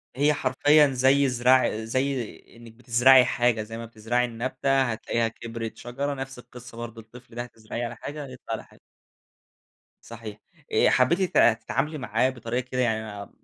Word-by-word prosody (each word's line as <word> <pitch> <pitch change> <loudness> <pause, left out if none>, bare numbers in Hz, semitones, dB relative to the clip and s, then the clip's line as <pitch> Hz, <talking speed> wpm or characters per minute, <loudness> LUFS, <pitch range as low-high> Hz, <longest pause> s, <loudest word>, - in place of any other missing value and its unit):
هي 145 +3 +3
حرفيًا 145 +2 +4
زي 135 +1 +3
زرع 125 -2 +3
زي 130 +1 -2 0.2
إنّك 115 -1 -14
بتزرعي 125 +2 +5
حاجة، 120 -2 +1
زي 115 +1 -8
ما 115 - -6
بتزرعي 115 +2 -1
النبتة 130 +3 0
هتلاقيها 115 -1 -1
كبرت 115 0 -7
شجرة، 140 +4 -4
نفس 135 -1 -7
القصّة 125 -1 -13
برضو 115 -1 -7
الطفل 120 +2 -16
ده 120 - -3
هتزرعيه 115 0 -6
على 120 +1 -6
حاجة 145 +5 -7
يطلع 130 -3 -8
على 110 - -4
حاجة. - - -22 1.2
صحيح 115 -3 -9 0.3
آآ - - +4
حبيتِ 150 +9 +3 0.2
ت 115 -2 +5
تتعاملي 150 +6 -2
معاه 120 -1 +1
بطريقة 120 -1 -3
كده 125 0 -1
يعني 110 -3 -2
120 Hz, 155 wpm, -25 LUFS, 115-130 Hz, 1.2 s, بتزرعي